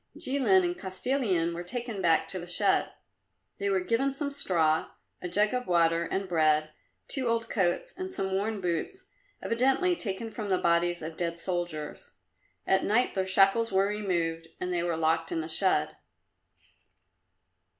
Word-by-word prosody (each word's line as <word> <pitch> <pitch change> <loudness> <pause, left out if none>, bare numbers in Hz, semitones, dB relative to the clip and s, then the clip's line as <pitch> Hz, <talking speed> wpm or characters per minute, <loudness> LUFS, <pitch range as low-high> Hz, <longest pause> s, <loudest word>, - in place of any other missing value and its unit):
Jilin 240 -9 +3
and 175 0 -1
Kostilin 185 -3 -1
were 170 - -5
taken 230 +2 -5
back 165 -3 +3
to 185 - -2
the 175 - -8
shed. 195 +3 +2 0.7
They 200 - 0
were 190 -1 +1
given 260 +8 0
some 285 0 -2
straw, 165 - +1 0.3
a 180 - -4
jug 210 +5 +2
of 250 0 -2
water 170 -1 +2
and 190 +3 -3
bread, 155 -3 +2 0.4
two 260 -3 -1
old 230 0 -1
coats 180 -5 0
and 370 +1 -5
some 190 - -2
worn 200 +2 -1
boots, 185 - -3 0.3
evidently 270 +10 +2
taken 220 - -4
from 210 -2 -5
the 185 - +3
bodies 170 0 +1
of 160 0 -7
dead 170 -1 -2
soldiers. 170 - -4 0.5
At 190 0 +2
night 240 +5 +2
their 190 -1 -1
shackles 195 +4 +4
were 190 0 +3
removed 170 -6 -2
and 180 0 -3
they 175 - 0
were 170 -1 -1
locked 165 0 0
in 165 - -1
the 155 - -5
shed. 185 +4 +1
190 Hz, 160 wpm, -28 LUFS, 170-230 Hz, 0.7 s, shackles